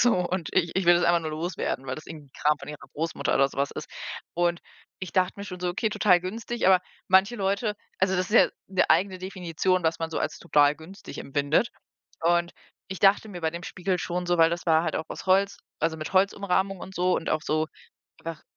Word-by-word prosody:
So 245 -1 +5 0.2
und 180 -4 -2
ich 170 -3 +1
ich 190 -2 0
will 175 - +8
das 175 - +2
einfach 170 0 +4
nur 160 -1 -4
loswerden,“ 155 -4 -3
weil 130 - -2
das 155 - -10
irgendwie 150 -4 -10
Kram 150 0 +2
von - - -10
ihrer 150 0 -7 0.2
Großmutter 165 +2 -1
oder 135 0 +4
so - - -14
was 140 0 +1
ist. - - -7 0.5
Und 175 0 +1 0.4
ich 185 -4 -6
dachte 185 -1 +2
mir 200 - -5
schon 180 -3 -8
so: 180 - -1
„Okay, 195 +5 0
total 185 -4 +4
günstig,“ 225 +5 -3
aber 185 -1 +6 0.3
manche 190 +5 +4
Leute 200 +2 0 0.2
also, 190 0 +2
das 180 +1 -1
ist - - -1
ja - - +7 0.2
'ne 190 -1 +2
eigene 185 +3 +3
Definition, 185 -1 -1
was 160 0 +1
man 165 0 -3
so - - -2
als - - -2
total 145 -3 +4
günstig 165 +6 -11
empfindet. 145 - +1 0.5
Und 170 +1 +2 0.4
ich 190 -1 -5
dachte 200 +2 +4
mir 180 -4 -7
bei 160 - +1
dem 170 +2 -7
Spiegel 185 +1 -2
schon 180 +1 -3
so, 175 0 +2
weil 165 0 +6
das 175 +1 -4
war 160 -1 +4
halt - - -1
auch 160 - -3
aus - - -8
Holz, 195 +1 +3 0.2
also, 165 -1 0
mit 155 +2 -6
Holzumrahmung 195 0 +2
und 190 - -9
so 180 +1 +2
und - - -4
auch 155 - +1
so 155 -1 0 0.5
einfach 165 -1 -7
175 Hz, 230 wpm, -26 LUFS, 160-190 Hz, 0.5 s, will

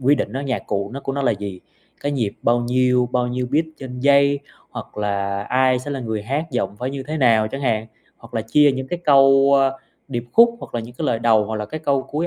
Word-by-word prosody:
quy 135 +3 +4
định 140 - -2
nó 135 - -3
nhạc 135 -3 -2
cụ 100 -1 -2
nó 140 - -6
của 135 - -4
nó 140 +1 -2
là 125 - +3
gì, 100 -3 -6 0.4
cái 145 - -2
nhịp 115 -7 -1
bao 120 +1 +2
nhiêu, 125 0 +2
bao 125 -1 +1
nhiêu 125 +1 -2
beat 155 +3 +2
trên 125 -2 -7
giây 140 +1 +4 0.3
hoặc - - -9
là 100 -1 -2
ai 130 +3 +2
sẽ 130 +3 -7
là 140 -2 -3
người 110 -3 -3
hát, 140 +9 -2
giọng 105 -6 -2
phải 125 +4 -3
như 135 -1 -5
thế 150 +4 -4
nào 115 -6 +3
chẳng 135 +5 -6
hạn, 110 -4 0 0.3
hoặc 115 +1 -16
là 110 - -1
chia 145 +6 +4
những 130 0 -4
cái 175 - -3
câu, 135 -1 +5
a, 135 0 +3 0.4
điệp 120 -3 -3
khúc 235 +1 +6
hoặc - - -10
là 120 - -1
những 115 +2 -10
cái 155 +4 -3
lời 115 - +1
đầu, 110 -2 +3
hoặc 110 +1 -4
là 105 0 -4
cái 155 +8 -6
câu 140 -3 +1
cuối 155 +5 -3
125 Hz, 260 wpm, -21 LUFS, 115-140 Hz, 0.4 s, khúc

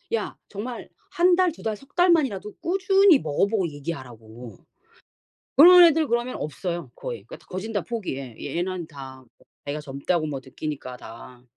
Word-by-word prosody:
야 - - -4
정말 230 +4 -7 0.2
한 355 +1 +4
달, 365 -1 +3
두 - - -14
달, 220 -1 -1
석 275 +9 -19
달 355 +1 +4
만이라도 210 - 0
꾸준히 385 0 +4
먹어보고 190 +5 0
얘기하라고, 125 - -8 1.0
그런 355 +4 +10
애들 320 -2 +4
그러면 240 +2 -1
없어요 170 -1 -5
거의. - - -6
야 - - -6
거진 190 +5 -5
다 205 - -1
포기해. 140 - -5
얘 - - -5
얘네는 175 0 -3
다 130 -2 -11 0.4
애가 145 +2 -3
젊다고 150 +4 -2
뭐 140 -3 -4
느끼니까 130 -1 -6
다. 120 +2 -12
185 Hz, 310 characters per minute, -24 LUFS, -, 1.0 s, 그런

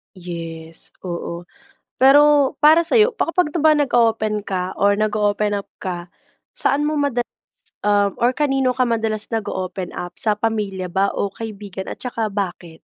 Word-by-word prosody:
Yes, 165 -2 -8 0.2
oo. 170 0 -5 0.5
Pero 290 +1 +6
para 310 +3 +6
sayo, 435 +7 +3
pa 430 - -1
kapag 335 -3 +1
ba 310 0 +5
nag-oopen 225 -6 +2
ka 185 -2 -3
or 200 0 +2
nag-oopen 210 -1 +1
up 200 -1 -4
ka, 175 -2 -5 0.4
saan - - +1
mo 300 +1 0
madalas, 265 -4 0 0.5
um 205 -1 +2
or 240 - +5
kanino 270 -1 +1
ka 255 0 +1
madalas 220 -2 -1
nag-oopen 185 -4 -3
up? 175 0 -5
Sa 215 -2 +1
pamilya 210 -4 -2
ba 190 +3 +1
o 200 -1 -1
kaibigan? 205 -4 -7
At - - -6
saka 230 -3 -2
bakit? 175 -5 -5
215 Hz, 150 wpm, -20 LUFS, 190-265 Hz, 0.5 s, Pero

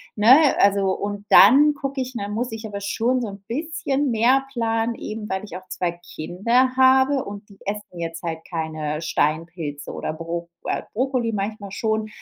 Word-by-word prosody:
ne, 260 +8 +6
also 200 -1 +3
und 205 0 -4
dann 285 +9 +7
gucke 275 -1 -4
ich 255 0 -3
Dann 205 -2 -4
muss 230 +2 -2
ich 225 0 -6
aber 200 -1 -5
schon 235 +5 0
so 230 - -2
’n 200 -1 -9
bisschen 285 -1 -1
mehr 250 +4 +3
planen, 225 -1 0
eben 215 0 -6
weil 190 +1 -3
ich 185 -4 -7
auch 185 - -14
2 175 -2 -2 0.2
Kinder 230 +11 +1
habe, 265 +1 +4
und 205 +1 -9
die 200 - -16
essen 200 -3 -5
jetzt 165 0 -5
halt 160 -1 -3
keine 155 -2 -3
Steinpilze 155 -2 -2
oder - - -4
Bro 170 +1 -5 0.2
äh, - - -1
Brokkoli 250 -1 0
manchmal 200 0 -4
schon. 220 +1 -1
210 Hz, 175 wpm, -23 LUFS, 180-250 Hz, 0.2 s, dann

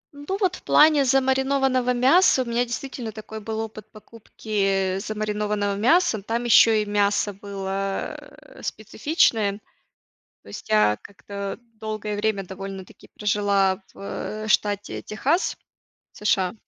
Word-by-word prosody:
Ну, 290 +7 -4
вот 370 -3 +2
в - - -17
плане 300 -2 +5
замаринованного 265 -1 +2
мяса 265 +2 +4
у - - -12
меня 235 +1 0
действительно 240 -1 -5
такой 220 0 -8
был 220 +1 -5
опыт 215 -1 -6
покупки, 200 -3 -2
э, - - -3
замаринованного 210 -1 -2
мяса. 235 - +3
Но 195 - -10
там 230 +3 -2
еще 225 -2 +6
и - - -7
мясо 205 0 +1
было, 195 0 -4
э, - - -16
специфичное. 225 - +1 0.9
То - - -20
есть 100 - -9
я 105 0 +4
как-то 200 +1 -7
долгое 215 -1 -4
время 205 -2 -1
довольно-таки 195 0 -9
прожила 200 -1 +1
в, - - -16
э, 215 +2 -5
штате 205 -1 0
Техас, 285 - -1 0.5
США 190 -3 0
215 Hz, 135 wpm, -24 LUFS, 200-245 Hz, 0.9 s, еще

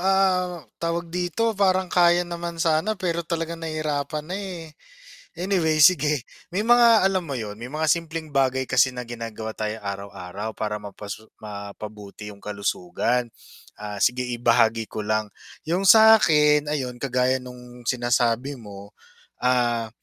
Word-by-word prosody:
ah, 185 -3 +1 0.2
tawag 170 0 -2
dito, 180 +6 0
parang 190 -2 +1
kaya 175 0 +4
naman 170 -1 -5
sana, 165 +6 +1
pero 170 -3 -1
talagang 165 0 -4
nahihirapan 155 -2 -3
na, 180 +4 -4
eh. 180 -6 -7 0.6
Anyway, 170 -4 +1
sige, 150 -3 +5 0.3
may 195 - +1
mga 235 -1 +6
alam 185 -2 -1
mo 145 - -5
yun, 105 -5 -5
may 115 - -7
mga 155 +4 -2
simpleng 165 -1 -1
bagay 130 -2 0
kasi 130 - +3
na 125 - -5
ginagawa 115 -2 -6
tayo 110 0 -3
araw-araw 100 +1 -6
para 105 -1 -3
mapasu 105 +1 -9 0.2
mapabuti 105 0 -8
yung 100 - -11
kalusugan. 105 +4 -2 0.4
Ah, 105 -1 -7
sige 125 +6 +2
ibahagi 115 -2 +2
ko 110 - -6
lang. 110 -1 -1 0.3
Yung 180 +4 +1
sa'kin 155 -10 +6
ayun, 130 -5 -3
kagaya 130 0 +1
nung 125 -1 -12
sinasabi 120 +1 +1
mo, 100 -5 -11 0.5
ah, 120 -2 +1
135 Hz, 140 wpm, -24 LUFS, 110-170 Hz, 0.6 s, mga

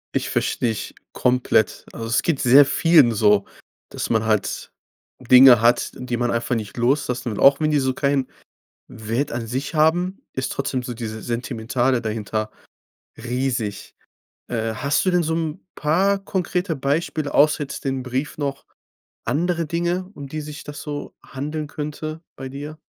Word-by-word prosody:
Ich - - 0
verstehe 120 - 0
dich 110 - -5 0.2
komplett. 125 -4 +1
Also, 115 - -6
es 115 - +2
geht 160 -5 0
sehr 135 +3 +7
vielen 150 -3 +5
so, 105 -2 +4 0.5
dass - - -4
man 110 -1 +2
halt 110 -2 -1 0.5
Dinge 125 -1 +8
hat, 120 +1 +3
die 125 -1 -3
man 120 0 0
einfach 115 +1 -1
nicht 110 0 -5
loslassen. 125 -1 0
Und - - -6
auch 135 0 +6
wenn 155 - +1
die 150 - +3
so 130 0 0
kein 140 0 +1 0.6
Wert 115 +7 -3
an 120 -1 -3
sich 130 +7 -3
haben, 175 +5 +2
ist 130 - -2
trotzdem 135 -2 -2
so 120 -1 -5
diese 110 -1 -6
Sentimentale 120 +2 -1
dahinter 110 -1 -3 0.7
riesig. 120 -3 -3 0.5
Äh, 115 -1 -2
hast 140 +5 0
du 185 - +3
denn 180 -1 +2
so 160 0 -1
'n 160 +1 -3
paar 190 +7 +2
konkrete 180 -2 -2
Beispiele, 145 +2 -1
außer 150 0 +4
jetzt 140 +2 -8
dem 135 -1 -1
Brief 130 +4 -3
noch 140 -1 -3 0.6
andere 170 +1 0
Dinge, 175 +3 -1
um 140 -1 -8
die 155 +3 -5
sich 150 0 -8
das 145 -1 -8
so 145 -1 -6
handeln 150 +3 -5
könnte 155 +2 -5
bei 135 0 -7
dir? 145 +3 -8
135 Hz, 160 wpm, -22 LUFS, 120-155 Hz, 0.7 s, Dinge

